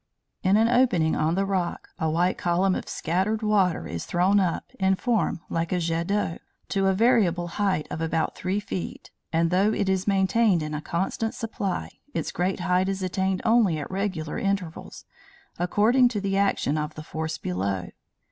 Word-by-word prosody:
In 190 +2 +4
an 225 +1 +4
opening 235 -10 +3
on 160 +2 +1
the 195 +1 +1
rock, 185 -3 -2
a 160 - +1
white 175 +4 +1
column 180 +2 +1
of - - -4
scattered 190 +7 -1
water 200 -5 +2
is 85 -1 -5
thrown 185 +4 +2
up, 180 -4 -1
in 190 0 +3
form, 225 -5 0
like 165 0 -2
a 180 - +1
jet 165 0 -1
d'eau, 200 -5 -1 0.3
to 195 -1 +1
a 190 - +3
variable 195 -6 +3
height 190 -5 0
of 160 - -4
about 160 0 -1
three 185 +3 -1
feet, 190 -3 -6 0.2
and, 165 +1 +2
though 195 +4 +3
it 205 -2 -1
is 190 0 0
maintained 195 -2 +3
in 150 0 -4
a 150 - -3
constant 190 +7 -2
supply, 200 -5 -3 0.2
its - - -2
greatest 180 +1 -1
height 180 +1 +2
is 195 -1 -2
attained 190 0 -1
only 220 -8 +4
at 150 - -6
regular 190 -5 -2
intervals, 195 -4 -3 0.5
according 220 +8 +4
to 235 -4 -2
the 195 -1 -1
action 195 -6 +1
of 150 0 -4
the 155 - -7
force 160 0 -4
below. 95 0 -2
185 Hz, 180 wpm, -25 LUFS, 165-200 Hz, 0.5 s, In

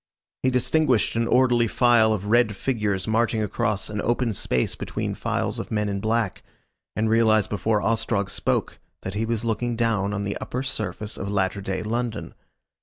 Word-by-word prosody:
He 130 - +2
distinguished 130 -1 +2
an 115 0 +1
orderly 120 -2 +4
file 115 -1 +4
of 100 -2 -1
red 110 -1 +3
figures 105 -5 -1
marching 110 0 +1
across 105 0 -1
an 105 -1 -3
open 120 0 0
space 65 -9 0
between - - -4
files - - -2
of - - -5
men 105 -1 0
in 100 -1 -2
black, 110 -2 -1 0.5
and 110 +1 +1
realised 110 -2 +3
before 105 0 0
Ostrog 105 -3 0
spoke - - -1 0.2
that 95 - -4
he 110 +2 -1
was 115 0 -2
looking 115 +1 -1
down 110 -4 0
on 105 0 -2
the 100 0 -3
upper 125 +2 -4
surface 105 -4 -3
of 100 +1 -3
latter 100 0 0
day 95 -1 -3
London. 115 +1 -3
110 Hz, 175 wpm, -24 LUFS, 100-115 Hz, 0.5 s, orderly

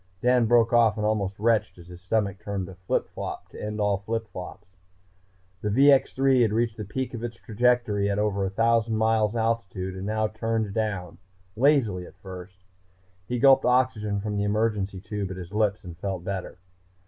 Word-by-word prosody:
Dan 125 0 +3
broke 115 0 +4
off 115 -3 +4
and 105 - -1
almost 100 -3 -1
retched 110 -1 +1
as 85 -1 -14
his 90 0 -11
stomach 100 0 -1
turned 100 -3 -4
a 95 - -9
flip 90 0 -2
flop - - -6
to - - -10
end 105 0 -4
all 105 -1 +2
flip 115 +2 -3
flops. 90 0 -9 0.9
The 105 - -1
VX 135 +5 +5
3 135 -1 +3
had 110 -3 +3
reached 115 0 0
the 105 - -4
peak 130 +6 -4
of 115 -1 -6
its 120 -1 -5
trajectory 115 -3 +1
at 100 - 0
over 105 -1 0
1000 115 +3 +1
miles 110 0 +2
altitude 110 -5 -2
and 95 +1 -5
now 110 0 0
turned 110 -1 -2
down, 95 -6 -3 0.4
lazily 115 -9 +2
at - - -16
first. 95 -1 -11 0.6
He 125 - -2
gulped 135 +2 +6
oxygen 125 -5 +1
from 105 0 -3
the 100 - 0
emergency 105 -2 0
tube 105 -2 -4
at 95 - -6
his 90 +1 -9
lips 105 -1 0
and 90 -3 -9
felt 95 0 -4
better. 95 -2 -5
105 Hz, 185 wpm, -26 LUFS, 100-115 Hz, 0.9 s, gulped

